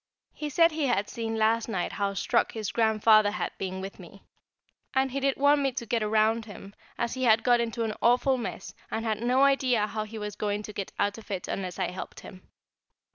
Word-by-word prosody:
He 300 -1 -5
said 330 +4 +4
he 305 -2 -1
had 210 -5 0
seen 225 -2 -3
last 225 +1 +1
night 185 -5 -2
how 200 -1 -2
struck - - +1
his 215 -3 -4
Grandfather 220 -2 +4
had 205 - -3
been 190 0 -4
with 195 +1 -8
me, 190 +2 -13 0.7
and 265 0 +2
he 275 - -2
did 275 0 0
want 285 +1 +4
me 270 -1 +1
to 240 -2 -4
get 230 +1 0
round 220 +1 +2
him, 200 -2 -11 0.2
as 235 -1 -1
he 260 0 -1
had 225 -1 +4
got 245 -1 +4
into 230 0 -2
an 220 -1 -2
awful 250 +2 +3
mess, 235 - -6 0.2
and 225 +1 -3
had 220 -2 -1
not 245 +2 +1
an 270 - +6
idea 260 -5 +3
how 215 0 -4
he 220 +1 -9
was 210 -1 -5
going 210 0 -2
to 210 - -8
get 200 -2 -5
out 205 +2 0
of 225 - -16
it, 190 -3 -4
unless 185 -3 -4
I - - -1
helped 185 - -8
him. 185 -2 -13
220 Hz, 230 wpm, -27 LUFS, 205-245 Hz, 0.7 s, an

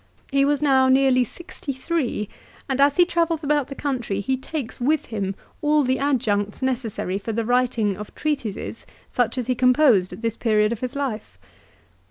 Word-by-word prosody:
He 275 0 +3
was 290 0 +1
now 265 -2 +4
nearly 260 -1 +4
sixty 285 +2 -7
three, 260 - -2 0.4
and, 270 0 0
as 285 0 +4
he 355 - +7
travels 335 -2 0
about 290 -2 +1
the 275 - -7
country 250 -9 -2
he 260 +6 0
takes 265 -1 -6
with 295 +4 +1
him 200 -3 -3 0.3
all 300 0 +3
the 260 0 +1
adjuncts 220 -6 0
necessary 230 -7 -2
for 225 +2 -4
the 225 +1 -1
writing 240 -4 +1
of 210 +2 -9
treatises 275 -8 -3 0.2
such 245 0 0
as 250 - -1
he 255 - +1
composed 250 -6 +4
at - - -9
this 230 -1 -1
period 215 -2 +2
of 235 - -3
his 255 +2 -4
life 260 -7 -4
255 Hz, 180 wpm, -23 LUFS, 225-280 Hz, 0.4 s, he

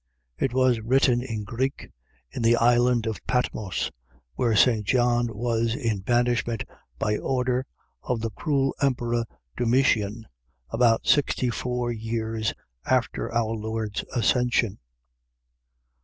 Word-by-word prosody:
It 135 - +1
was 130 -2 +3
written 125 +1 +3
in 115 -4 -4
Greek, 130 +6 -3 0.4
in - - -5
the 115 +1 +5
island 120 0 +3
of 110 -2 -4
Patmos, 110 -6 -1 0.4
where 115 - +1
St. 110 0 +4
John 120 +2 +2
was 115 +1 -1
in 115 -7 -1
banishment 120 +1 0 0.3
by 105 +9 0
order 125 0 -1 0.3
of 125 -3 -2
the 115 0 -2
cruel 135 +2 0
emperor 120 -4 +1 0.3
Domitian, 115 -3 +1 0.5
about 115 -2 +3
sixty 130 -4 +2
four 125 0 -2
years 110 -1 -2 0.3
after - - 0
our 115 -1 0
Lord's 110 -1 -3
Ascension. 120 -3 +1
120 Hz, 115 wpm, -25 LUFS, 110-125 Hz, 0.5 s, the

